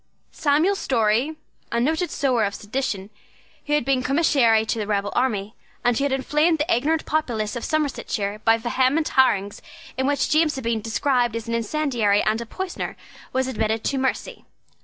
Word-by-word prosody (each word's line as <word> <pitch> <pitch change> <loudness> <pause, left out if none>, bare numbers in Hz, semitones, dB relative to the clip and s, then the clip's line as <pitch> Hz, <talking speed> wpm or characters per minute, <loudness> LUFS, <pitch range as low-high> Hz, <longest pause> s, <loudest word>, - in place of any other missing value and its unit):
Samuel 315 +6 +2
Storey, 245 - +1 0.4
a 235 - +1
noted 315 +7 0
sower 255 -7 +1
of 200 -1 -1
sedition, 210 -3 -4 0.6
who 295 - 0
had 295 -5 +2
been 270 -1 +2
Commissary 255 -6 +3
to 225 - -2
the 210 - -3
rebel 205 -1 -1
army, 215 -5 0 0.3
and 245 -1 +3
who 275 - 0
had 285 - 0
inflamed 300 +5 +2
the 300 -4 +1
ignorant 310 +6 0
populace 240 -8 -1
of 240 - -4
Somersetshire 240 -9 -2
by 225 0 +4
vehement 260 +6 +1
harangues 205 -6 +2 0.4
in 265 - +1
which 285 +1 0
James 310 -1 +3
had 265 - -5
been 230 -1 -1
described 240 +1 0
as 230 0 -5
an 230 - -3
incendiary 230 -4 +1
and 220 +2 0
a 235 - -7
poisoner, 375 +7 -5 0.3
was 260 0 0
admitted 220 -3 -1
to 275 - -1
mercy. 265 0 -2
255 Hz, 175 wpm, -23 LUFS, 220-295 Hz, 0.6 s, by